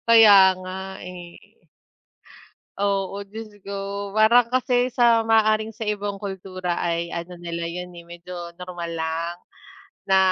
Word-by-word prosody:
Kaya 225 -3 +8 0.2
nga 185 0 -7 0.3
eh. 180 -1 -9 1.5
Oo, 200 0 -1
Diyos 220 +2 -9 0.2
ko, 200 0 -5
parang 230 +3 +4
kasi 250 -1 +1
sa 235 -2 +4
maaaring 220 0 +3
sa 220 -1 -5
ibang 205 -1 -3
kultura 185 -3 -4
ay 170 0 -1
ano 175 +1 -6
nila 170 -1 -4
'yon 180 +2 -5
eh 170 - -10
medyo 170 0 -9
normal 175 -2 -6
lang 165 +1 -3 0.7
na 190 - +6
195 Hz, 130 wpm, -23 LUFS, 175-215 Hz, 1.5 s, Kaya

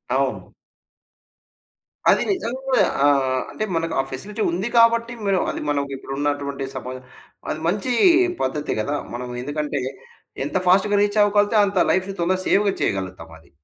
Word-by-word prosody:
అవును. - - -2 1.6
అది - - +4
నిజంగా 265 - 0 0.2
ఆహ్, 135 -2 +2
అంటే - - -4
మనకు 165 0 -1
ఆ - - +5
ఫెసిలిటీ 205 - -5
ఉంది 185 +6 -2
కాబట్టి, 230 0 +4
మిరు 195 -2 +2
అది - - -6
మనకి 140 -1 -1
ఇప్పుడు 135 - -8
ఉన్నటువంటి 145 -1 -2
సమ - - -6 0.7
అది 155 - -4
మంచి 205 +7 0 0.5
పద్ధతే 150 +3 -2
కదా! 145 +7 -2 0.2
మనం 125 +1 -5
ఎందుకంటే 145 0 -3 0.6
ఎంత 145 - -1
ఫాస్ట్‌గా 200 +3 +4
రీచ్ 205 +1 +2
అవ్వగలితే 205 +1 +2
అంత 200 -1 -3
లైఫ్‌ని 190 +1 -1
తొందర 185 +2 +1
సేవ్‌గా 200 0 +3
చేయగలుగుతాం 95 -4 -3
అది. 80 - -24
180 Hz, 140 wpm, -22 LUFS, 140-205 Hz, 1.6 s, ఆ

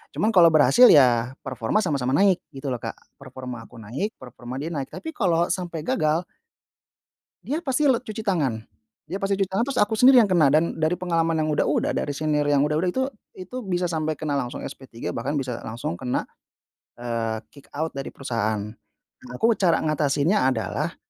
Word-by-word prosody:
Cuman 220 +2 +1
kalau 175 -4 +7
berhasil, 165 - +6
ya 125 -3 +5
performa 130 - -1
sama-sama 135 -7 -1
naik 195 0 +4 0.2
gitu 135 0 -4
loh, 120 - -4
Kak. - - -5 0.2
Performa 125 -3 -8
aku - - -18
naik, 125 - -4
performa 125 0 -9
dia 160 +4 -4
naik. 140 -3 -3
Tapi 320 - -6
kalau 175 - +2
sampai 175 -4 -3
gagal 155 +2 +1 1.2
dia 290 - -2
pasti 280 +2 +2
le 255 - +4
cuci 220 -2 -7
tangan. 150 - 0 0.5
Dia 195 - -3
pasti 195 0 0
cuci 195 -1 -1
tangan 210 +5 0
terus 275 - 0
aku 210 +1 +1
sendiri 250 +2 +7
yang 210 - +1
kena, 170 -6 +4
dan 160 +2 +2
dari 160 +2 +1
pengalaman 165 -2 0
yang 155 - -1
udah-udah, 145 -1 +1
dari 145 - -2
senior 150 0 0
yang 145 -1 +3
udah-udah, 150 +4 0
itu 260 - 0 0.3
itu 185 +7 -8
bisa 180 -2 -1
sampai 155 -1 -1
kena 145 -1 -2
langsung 125 -2 -5
SP3 120 -3 -7
bahkan 130 +5 -3
bisa 130 -4 -2
langsung 110 -6 -4
kena, 125 - -1 0.7
eee, 115 -2 -3
kick 140 - -17
out 160 +2 -2
dari 135 0 -5
perusahaan. 110 -5 -2 0.6
Nah, 255 -1 -13
aku 230 +1 +3
cara 175 -4 +2
ngatasinnya 150 +2 +2
adalah 110 - -3
155 Hz, 180 wpm, -24 LUFS, 130-190 Hz, 1.2 s, kalau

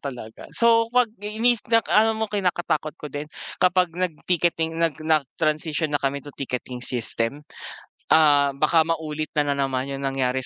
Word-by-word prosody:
talaga. 125 -5 -8
So, 230 -1 +5
'pag 245 -2 +2
mis 220 +3 +1
nak 230 0 +3
alam 220 +1 +4
mo 220 - -1
kinakatakot 180 -7 -1
ko 150 -3 -9
din 145 +1 -5 0.3
kapag 180 -1 +3
nag-ticketing, 170 -1 -1
nag 165 -4 +1
nag-transition 155 +1 0
na 145 - +1
kami 140 0 -2
to 145 - -10
ticketing 125 -2 -5
system. 125 +3 -2 0.7
Ah, 145 -3 +5
baka 155 +3 +3
maulit 155 -2 -3
na 145 -2 +1
naman 135 -1 -1
yung 140 0 -5
nangyari 130 -1 -1
155 Hz, 150 wpm, -23 LUFS, 140-180 Hz, 0.7 s, So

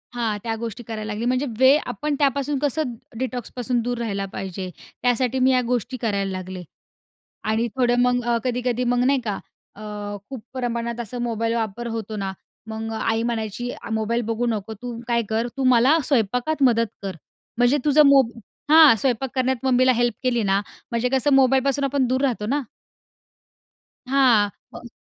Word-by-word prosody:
हां. 225 -3 -1
त्या 225 -1 -2
गोष्टी 230 +1 -6
करायला 215 -1 -5
लागली 220 +3 -3
म्हणजे 255 +3 +1
वे 260 +2 +7
आपण 300 -1 -2
त्यापासून 280 0 +1
कसं 290 -2 -1 0.3
डिटॉक्सपासून 250 -1 -2
दूर 245 +1 -2
राहिला 200 -4 -2
पाहिजे? 190 -1 -5 0.3
त्यासाठी 250 +1 +1
मी 260 +1 +4
या 255 -1 +3
गोष्टी 250 +1 -1
करायला 200 -4 -1
लागले. 185 -1 -6 0.8
आणि 225 +2 0
थोडं 245 -2 +3
मग 245 0 +2
अ, 240 0 +1
कधी-कधी 250 0 -1
मग 245 0 +2
नाही 270 +1 +3
का 210 -3 -2 0.4
अ, 210 - -11 0.5
खूप 260 -5 -7
प्रमाणात 235 -2 -3
अस 235 0 -7
मोबाईल 230 -1 -1
वापर 230 0 -3
होतो 225 -2 -4
ना, 195 -2 -3 0.3
मग 220 0 -5
आई 225 0 0
म्हणायची 235 0 -3
अ, - - -9
मोबाईल 220 +2 0
बघू 230 +1 0
नको, 220 -2 -2
तू 235 +2 -7
काय 235 -1 +2
कर, 225 +2 0
तू 270 - -1
मला 260 +7 +5
स्वयंपाकात 250 +4 0
मदत 230 -3 +4 0.2
कर. 195 -3 -5 0.4
म्हणजे 245 +4 +4
तुझं 300 0 +6
मोब 270 -4 +5 0.4
हां 310 -5 +9
स्वयंपाक 255 +2 0
करण्यात 260 0 +1
मम्मीला 255 0 +4
हेल्प 240 -1 +1
केली 245 -3 +1
ना 195 -1 +2 0.3
म्हणजे 235 +1 0
कसं 270 +2 +2
मोबाईलपासून 270 +1 +3
आपण 275 -1 +1
दूर 255 +1 0
राहतो 240 -6 0
ना. 280 +6 0 1.5
हां, 250 -6 +4 0.2
हो. 240 - -9
240 Hz, 170 wpm, -23 LUFS, 225-260 Hz, 1.5 s, हां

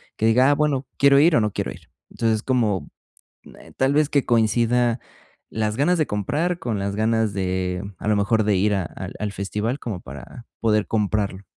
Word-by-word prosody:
que 110 - -1
diga, 125 +5 +4
ah, - - +3
bueno, 140 -3 0
quiero 140 0 +5
ir 160 +3 +5
o 115 - +4
no 105 -1 0
quiero - - -3
ir. - - -17 0.2
Entonces, 110 -2 0
como 110 - 0 0.9
tal 135 +1 +2
vez 150 0 +2
que 140 -2 +1
coincida 120 +1 +2 0.5
las 110 -1 -2
ganas 175 +6 +2
de 155 - +2
comprar 150 - -1
con 115 - -3
las 100 0 -2
ganas 110 -1 +1
de, 95 -1 -2 0.2
a - - -6
lo 105 - +3
mejor, 105 +2 +2
de 105 -1 +2
ir 105 +3 +2
a 95 - -1
al 95 +3 -8
al 105 -1 -2
festival 105 +7 -3
como 105 -9 -5
para 70 - -11
poder 110 -2 +2
comprarlo. 105 -2 -1
110 Hz, 190 wpm, -22 LUFS, 100-130 Hz, 0.9 s, quiero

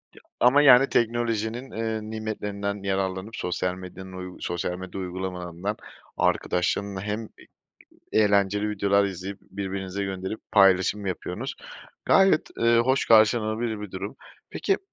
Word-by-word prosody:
Ya - - -16 0.2
ama 125 +4 +6
yani 135 -1 +7
teknolojinin, 120 +1 0
eee, 110 0 -2
nimetlerinden 105 -2 -4
yararlanıp 95 +2 -2
sosyal 90 0 -2
medyanın, 95 0 -10
uy 90 0 -7
sosyal 85 +1 -3
medya 95 +1 -7
uygulamalarından, 90 +1 -4 0.4
arkadaşlarınla 95 +2 0
hem 105 +3 -3
e - - -18
i - - -21 0.7
eğlenceli 100 0 +3
videolar 100 0 +2
izleyip, 95 0 -5
birbirinize 95 0 -4
gönderip 95 +2 -4
paylaşım 100 0 +4
yapıyorsunuz. 95 - -4 0.5
Gayet, 190 -5 +4
ııı, 115 0 +4
hoş 130 +3 +1
karşılanabilir 110 0 +3
bir 105 -2 -7
durum. 95 +2 -6 0.3
Peki, 390 - 0
100 Hz, 125 wpm, -25 LUFS, 95-110 Hz, 0.7 s, yani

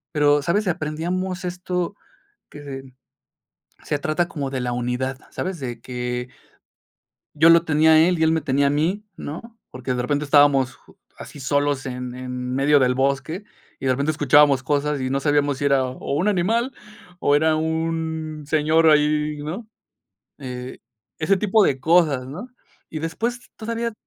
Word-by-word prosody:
Pero, 145 -1 +4
¿sabes?, 195 +8 0
aprendíamos 175 +4 -3
esto 180 +1 -3 0.5
que, 135 -3 -9 0.9
se 145 - -1
trata 155 +4 -1
como 140 -3 -4
de 130 -1 -3
la 125 0 -2
unidad, 125 +2 -2
¿sabes?, 185 -4 -4
de 120 -3 -5
que, 125 0 -4 1.1
yo 160 +2 +6
lo 170 0 +6
tenía 160 0 +4
a 155 - +7
él 175 +1 +3
y 160 - +3
él 160 - +3
me 160 - +1
tenía 140 0 +1
a - - 0
mí, 170 +9 0
¿no?, 225 +10 -8
porque 125 0 -4
de 125 - -1
repente 145 +4 -1
estábamos 140 -3 +4 0.4
así - - -10
solos 145 0 0
en 125 -1 -5
en 125 0 -5
medio 145 +1 +4
del 125 -1 +3
bosque 140 +8 -1 0.4
y 135 - -4
de 130 - +4
repente 140 +4 0
escuchábamos 145 -2 +4
cosas 145 0 0
y 130 - -1
no 140 +1 0
sabíamos 145 -2 +1
si 145 - -1
era 135 -2 +3
o 130 +2 -5
un 175 +7 0
animal 225 +7 +1 0.5
o 145 0 +3
era 160 +1 +3
un 160 -1 -2
señor 160 +1 +4
ahí, 150 0 +2
¿no?, 200 +9 -6 0.7
eh, 125 -2 -7 0.4
ese 165 +5 +2
tipo 210 +2 +3
de 135 -6 +1
cosas, 155 -5 +3
¿no?, 185 - -7 0.4
y 155 - -5
después 230 +10 -4
todavía 230 +1 -3
150 Hz, 160 wpm, -22 LUFS, 135-165 Hz, 1.1 s, a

